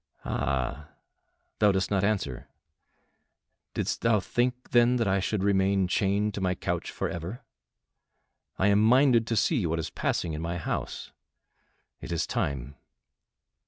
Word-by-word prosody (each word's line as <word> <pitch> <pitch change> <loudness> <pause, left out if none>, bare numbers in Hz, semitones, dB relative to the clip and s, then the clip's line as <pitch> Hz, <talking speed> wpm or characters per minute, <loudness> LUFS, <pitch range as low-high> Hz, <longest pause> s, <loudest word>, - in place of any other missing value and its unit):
"Ah! 70 +3 -2 0.7
thou 105 -1 +5
dost 95 0 -1
not 100 -2 +1
answer. 95 - -1 1.3
Didst - - -2
thou 115 -2 +3
think, 125 +5 -2
then, 120 +1 +5
that 115 -4 +1
I 95 0 +2
should 95 +1 -1
remain 95 -1 +2
chained 100 +3 +1
to 100 - -4
my 90 -1 +1
couch - - -3
forever? 85 +8 -5 1.1
I 95 - +3
am 100 +1 +4
minded 120 0 +5
to 115 - 0
see 110 - +2
what 80 +1 -1
is 80 -1 -4
passing 85 -3 -1
in 75 - -4
my 85 +1 -3
house. 80 - -4 0.9
It - - -8
is 85 - 0
time." 70 0 -3
95 Hz, 140 wpm, -28 LUFS, 85-110 Hz, 1.3 s, thou